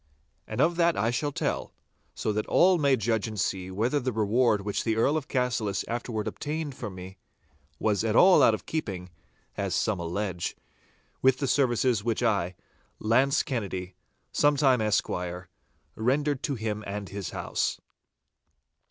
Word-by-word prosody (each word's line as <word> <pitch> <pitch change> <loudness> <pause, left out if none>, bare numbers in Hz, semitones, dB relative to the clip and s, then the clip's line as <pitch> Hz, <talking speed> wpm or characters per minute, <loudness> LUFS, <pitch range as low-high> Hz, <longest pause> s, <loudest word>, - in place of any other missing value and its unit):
And - - -5
of 170 +3 +2
that 170 -1 +3
I 110 +3 +1
shall 145 +4 -1
tell, - - -2 0.4
so 110 - -1
that 105 +1 -2
all 180 -1 +4
may 140 -3 +4
judge 110 -2 0
and 110 -2 -5
see 95 -1 -1
whether 115 +10 0
the 130 0 -2
reward 110 0 +2
which 100 0 -2
the 110 -1 0
Earl 125 +7 +2
of 155 -2 -2
Cassillis 120 -7 -1
afterwards 115 -2 -3
obtained 150 -1 -4
for 120 -3 -6
me, 95 0 -10 0.6
was 105 +3 +1
at 110 -1 0
all 185 +6 +7
out 110 - +6
of - - -11
keeping 95 - -4 0.5
(as - - -1
some 105 -4 0
allege) 90 +1 -3 0.6
with 130 -1 +4
the 140 0 -1
services 125 -4 +2
which 115 -1 -1
I, 95 -3 +1 0.4
Launce 130 +7 +2
Kennedy, 95 -8 -4 0.4
sometime 140 -4 +3
esquire, 90 -4 -1 0.5
rendered 140 +4 0
to 140 - -1
him 110 -2 -3
and 100 0 -4
his 100 -2 -5
house. - - -2
115 Hz, 155 wpm, -27 LUFS, 100-135 Hz, 0.6 s, all